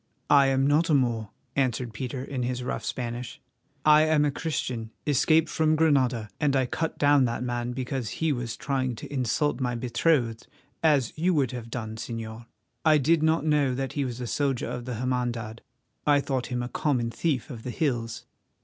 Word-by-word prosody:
"I 140 -1 +7
am 135 0 +2
not 150 +4 +3
a 155 - +5
Moor," 115 -5 +1 0.3
answered 125 -3 0
Peter 125 +3 -4
in 135 -2 -4
his 125 0 -2
rough - - -3
Spanish. 120 0 -4 0.5
"I 150 0 +7
am 155 -1 +3
a 145 - +1
Christian 130 -7 -3 0.2
escaped 155 +3 +3
from 155 0 +2
Granada, 130 -8 +2
and 145 -2 +2
I 130 -1 +3
cut 160 +6 -3
down 145 -2 +5
that 120 0 -2
man 120 0 -2
because 130 -2 -3
he 160 -2 +1
was 120 -2 -4
trying 130 -3 -1
to 130 - -9
insult 130 +1 0
my 125 -2 -1
betrothed, 120 0 0 0.3
as 145 -7 +3
you 180 +2 +2
would 135 -5 +2
have 120 -2 -7
done, 110 -2 -5
Señor. 115 0 -6 0.4
I 155 -1 +6
did 155 +3 +3
not 160 -1 +2
know 145 -4 +2
that 135 0 -3
he 145 - 0
was 125 -2 -4
a 125 - -3
soldier 135 +1 -1
of 120 - -5
the 125 -2 -4
Hermandad; 120 -2 -2 0.5
I 145 -1 +5
thought 135 -3 -2
him 125 -1 -2
a - - -3
common 125 -3 0
thief 140 -2 -1
of 115 -4 -7
the 125 - -6
hills." 120 -5 -2
130 Hz, 190 wpm, -27 LUFS, 120-145 Hz, 0.5 s, I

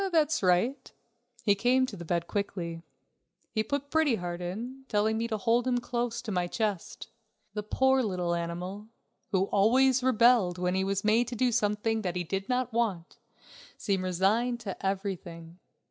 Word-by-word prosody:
"That's 315 -2 +2
right." 220 +9 +1 0.5
He 205 - +4
came 250 +5 +3
to 240 - -7
the 170 - -8
bed 170 0 -1
quickly. 170 -4 -3 0.7
He 220 - +1
put 285 +5 -3
Pretty 315 -6 +3
Heart 175 -2 -5
in, 235 +10 -5
telling 215 0 +1
me 230 +1 -1
to 220 -2 -2
hold 235 +4 +1
him 250 -1 +2
close 240 -1 -2
to 220 - -4
my 180 -2 0
chest. 205 -2 -3 0.4
The 210 - -2
poor 265 +5 +2
little 180 -6 -1
animal, 175 +5 -4 0.4
who 190 -2 +3
always 250 +7 +3
rebelled 235 -7 +4
when 180 0 0
he 190 0 +1
was 195 0 -1
made 220 +3 +3
to 245 - -5
do 250 +2 +2
something 220 0 0
that 180 -4 -3
he 180 - -1
did 195 +3 -4
not 250 -1 0
want, 205 -8 -2 0.6
seemed 195 -2 -1
resigned 205 +7 +1
to 200 -4 -6
everything. 180 -3 -4
210 Hz, 170 wpm, -29 LUFS, 185-245 Hz, 0.7 s, He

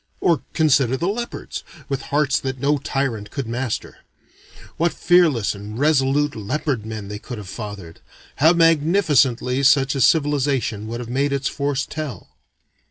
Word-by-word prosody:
Or 165 -6 +2
consider 135 -5 +3
the 170 - -1
leopards, 235 +4 -4 0.2
with 135 -1 -2
hearts 145 -1 +2
that 130 -1 -4
no 145 +2 +1
tyrant 125 -7 -2
could 140 -2 -4
master. 120 +1 -4 0.8
What 170 +1 +1
fearless 165 - +3
and 105 +2 -8
resolute 145 0 +2
leopard 110 +1 -2
men 110 -2 -6
they 105 0 -6
could 120 +2 -8
have 105 -3 -8
fathered! 100 -5 -8 0.4
How 155 +4 +6
magnificently 155 -6 +3
such 140 0 +4
a 135 - -2
civilization 140 -8 +1
would 120 +2 -5
have 120 - -8
made 140 +3 0
its 140 0 -1
force 140 -2 -1
tell! 155 -4 -6
135 Hz, 150 wpm, -21 LUFS, 115-150 Hz, 0.8 s, How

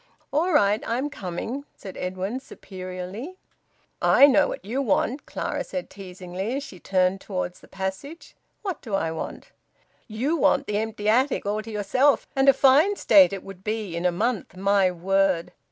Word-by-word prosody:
"All 330 +6 +2
right! 210 -8 +3
I'm 260 +6 -1
coming," 220 +7 -5
said 190 -2 -10
Edwin 185 +6 -3
superiorly. 190 - -8 0.6
"I 280 - +7
know 290 +1 +4
what - - -6
you 245 +7 -1
want," 260 +3 0
Clara - - -3
said 275 - -6
teasingly 190 +3 -6
as 280 - -3
she 185 -10 -11
turned 185 +1 +1
towards 180 -2 -4
the - - -17
passage. 190 - -6 0.3
"What 380 -6 -4
do 220 -6 -3
I 165 -4 -1
want?" 160 - -7 0.6
"You 250 +8 -1
want 325 - +3
the 210 0 -1
empty 220 -1 -4
attic 255 +4 +2
all 210 +1 -1
to 220 - -10
yourself, 255 +7 +2
and 270 0 +5
a - - +8
fine 280 +9 +5
state 285 - +6
it 195 -1 -5
would 195 -1 -11
be 215 -1 -2
in - - -2
in 170 - -3
a - - +2
month, 210 -1 -2
my 195 0 +3
word!" 185 0 +1
210 Hz, 175 wpm, -25 LUFS, 190-270 Hz, 0.6 s, a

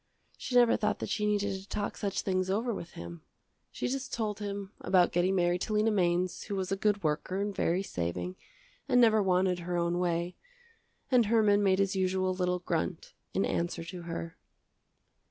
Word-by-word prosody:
She 250 - -5
never 240 -1 +6
thought 210 -1 0
that - - -5
she 210 -1 0
needed 205 -1 +1
to 195 - -17
talk 205 - -2
such 200 -2 -2
things 185 -1 0
over 225 +5 0
with 170 -4 -7
him. 85 -1 -8 0.5
She - - -3
just 265 +1 -3
told 215 -3 -2
him 200 -1 -5
about 180 -2 +3
getting 180 +2 +2
married 175 0 +2
to 215 - -2
Lena 215 +1 +3
Mainz 180 -2 +1
who 205 - -3
was 190 -1 -2
a - - +2
good 205 0 +1
worker 155 +5 -1
and 200 0 -2
very 180 +2 +1
saving 90 - -3 0.5
and 245 - +5
never 220 -3 +5
wanted 185 -1 +2
her 175 0 -3
own 170 +1 0
way, 175 0 -1 0.8
and 245 -4 +5
Herman 210 -2 +4
made 190 -2 +3
his 195 0 +1
usual 185 0 +1
little 180 -1 0
grunt 170 -1 -3 0.2
in 195 - +2
answer 170 0 -2
to 175 +2 -7
her. 165 -1 -6
190 Hz, 190 wpm, -30 LUFS, 175-205 Hz, 0.8 s, never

